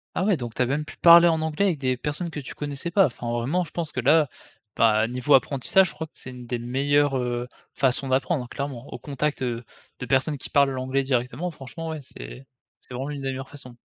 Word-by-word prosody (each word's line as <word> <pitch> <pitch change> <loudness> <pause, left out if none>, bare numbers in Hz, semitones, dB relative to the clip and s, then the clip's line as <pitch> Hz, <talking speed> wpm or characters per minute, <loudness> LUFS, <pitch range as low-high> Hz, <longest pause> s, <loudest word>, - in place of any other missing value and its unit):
Ah - - 0
ouais 200 -4 +3
donc 120 -4 -6
tu - - -1
as - - +4
même 145 +4 -1
pu - - -12
parler 170 0 +8
en 160 -1 +2
anglais 160 +5 0
avec 175 -7 0
des 130 -2 0
personnes 150 +6 -3
que 150 - -6
tu 135 - -8
connaissais 145 +3 -4
pas. 195 +2 +5
Enfin 120 -3 -4
vraiment 130 +10 0
je 160 - -10
pense 165 -3 -3
que - - -3
là, 145 +3 +4 0.5
bah 110 -1 +4
niveau 125 +4 +1
apprentissage 140 +7 +4
je - - -9
crois 160 +1 -6
que - - -46
c'est, 130 - -8
une 125 -1 -10
des 120 0 -2
meilleures, 140 +3 +1
heu, 120 -1 -2 0.3
façons 135 +1 +2
d'apprendre 130 0 0
clairement. 140 -2 -5
Au - - -7
contact, 145 +1 -2
heu, 120 -2 -2 0.4
de - - -4
personnes 135 +4 +1
qui - - -8
parlent 140 -2 +4
l'anglais 130 +1 -1
directement, 130 +6 -1
franchement 160 +3 -8
ouais 160 -1 -4
c'est 130 0 -10 0.3
c'est - - -14
vraiment 130 +3 -4
une 145 -2 -5
des 135 - -2
meilleures 135 0 -5
façons. 125 -4 -9
135 Hz, 235 wpm, -25 LUFS, 125-150 Hz, 0.5 s, parler